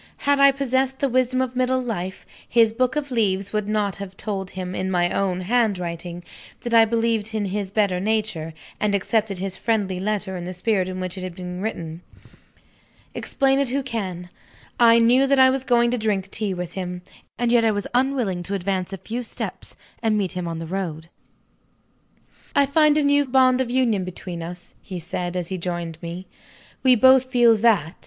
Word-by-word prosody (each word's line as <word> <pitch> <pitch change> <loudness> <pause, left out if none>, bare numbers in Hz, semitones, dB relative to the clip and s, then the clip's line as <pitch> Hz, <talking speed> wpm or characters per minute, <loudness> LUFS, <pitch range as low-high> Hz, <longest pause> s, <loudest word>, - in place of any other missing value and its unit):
Had 285 0 +3
I 275 0 +7
possessed 265 -1 0
the 275 - +1
wisdom 255 0 +1
of 255 -1 -3
middle 255 0 +1
life, 190 -7 -4 0.2
his 230 -2 +4
book 255 +3 0
of 290 -2 -3
leaves 200 -4 0
would 210 -1 -1
not 210 -2 -1
have 195 -1 -8
told 195 -3 -4
him, 185 -1 -6
in 185 0 -2
my 175 -1 +1
own 185 -2 0
handwriting, 180 -5 -1 0.4
that 240 - -4
I 225 -1 +7
believed 225 -1 0
in 210 -2 0
his 200 0 -3
better 200 -3 +1
nature, 195 -6 -2 0.2
and 210 -1 +1
accepted 205 0 0
his 185 0 -3
friendly 205 -5 -1
letter 200 -1 -2
in 175 - -5
the 180 +1 -5
spirit 190 -1 0
in 185 0 -5
which 185 -1 -4
he 190 - -7
had 185 -2 -6
written. 180 -2 -5 1.1
Explain 270 0 +1
it 280 -3 0
who 275 +2 -1
can 185 -8 -5 0.5
I 230 -1 +7
knew 245 +4 +4
that 275 0 +3
I 260 0 +7
was 265 0 -2
going 240 -2 +3
to 250 - -1
drink 200 -3 -1
tea 205 -3 -1
with 180 -1 -5
him, 180 -1 -5 0.3
and 240 -1 0
yet 240 -1 +4
I 225 - +4
was 205 -1 -1
unwilling 250 -8 0
to 195 +3 -3
advance 190 0 -2
a 195 - -5
few 225 +6 -5
steps, 240 - -6 0.3
and 220 -2 +1
meet 195 -3 -1
him 180 -2 -4
on 165 -1 -4
the 165 - -5
road! 165 -3 -4 1.5
"I 280 - +5
find 300 +1 +4
a 300 - +3
new 285 0 +3
bond 255 0 +4
of 250 - -2
union 240 -6 +1
between 180 -1 -6
us," 175 +1 -9
he 185 -3 -7
said, 175 +1 -4
as 175 -2 -3
he 190 -1 -3
joined 170 -2 -4
me. 170 +2 -6 0.6
"We 255 -1 +5
both 260 +2 +6
feel 240 -3 +4
_that. 205 -8 +2
210 Hz, 195 wpm, -23 LUFS, 185-245 Hz, 1.5 s, I